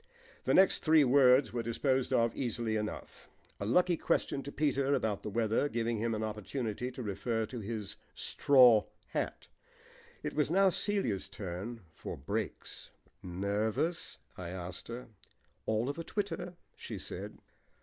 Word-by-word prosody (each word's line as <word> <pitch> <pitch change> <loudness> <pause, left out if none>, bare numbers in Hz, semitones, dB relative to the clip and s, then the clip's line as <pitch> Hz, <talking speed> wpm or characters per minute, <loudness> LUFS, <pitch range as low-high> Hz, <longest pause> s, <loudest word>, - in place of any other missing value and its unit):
The - - +3
next 190 0 +6
three 155 -1 +5
words 130 0 +5
were 120 - 0
disposed 130 +3 0
of 115 0 +2
easily 115 -3 -1
enough, 105 0 -5 0.3
a 100 - -3
lucky 175 +7 +3
question 140 - 0
to 140 - -7
Peter 140 -2 +1
about 105 -5 -1
the - - -4
weather 115 +6 +1
giving 115 -2 -1
him 115 0 0
an 110 - -2
opportunity 110 +2 -3
to 130 0 -7
refer 110 +2 -1
to 120 +2 -6
his 110 -1 -4 0.2
straw 125 -6 +5 0.2
hat. - - -3 0.8
It - - -3
was 150 -1 +1
now 190 +2 +5
Celia's 180 - 0
turn 100 +4 -6
for - - -7
"breaks." 100 +10 -4 0.3
"Nervous?" 110 - -1 0.2
I 90 -2 -6
asked 90 +1 -6
her. 120 +2 -6 0.6
"All 110 +2 +1
of 145 +4 -3
a - - -3
twitter," 180 -1 -3 0.2
she - - -7
said. - - -5
115 Hz, 150 wpm, -32 LUFS, 105-140 Hz, 0.8 s, next